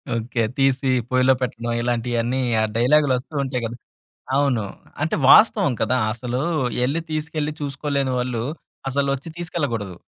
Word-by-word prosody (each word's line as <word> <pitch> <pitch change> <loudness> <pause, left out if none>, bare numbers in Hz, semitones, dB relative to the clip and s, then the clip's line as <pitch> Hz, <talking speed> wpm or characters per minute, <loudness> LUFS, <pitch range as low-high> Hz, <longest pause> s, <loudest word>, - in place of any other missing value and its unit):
Okay. 115 +1 -1
తీసి 135 0 +2 0.2
పొయిలో 130 +1 +4
పెట్టడం 120 -1 -2
ఇలాంటియన్నీ, 120 +1 0 0.2
ఆ - - +3
డైలాగులొస్తు 140 +2 +2
ఉంటాయి 130 -2 -3
కద్ 115 +1 -5 0.6
అవును. 135 -6 +2 0.4
అంటే 155 - 0
వాస్తవం 210 - +6
కదా! 125 +4 +2
అసలు 120 +2 -3 0.4
ఎళ్ళి 145 +6 0
తీసుకెళ్ళి 155 -1 -2
చూసుకోలేని 140 -2 -1
వాళ్ళు, 125 -2 -2 0.5
అసలు 140 +1 0
ఒచ్చి 140 +5 -10
తీసుకెళ్ళకూడదు. 125 - -3
130 Hz, 125 wpm, -22 LUFS, 120-145 Hz, 0.6 s, వాస్తవం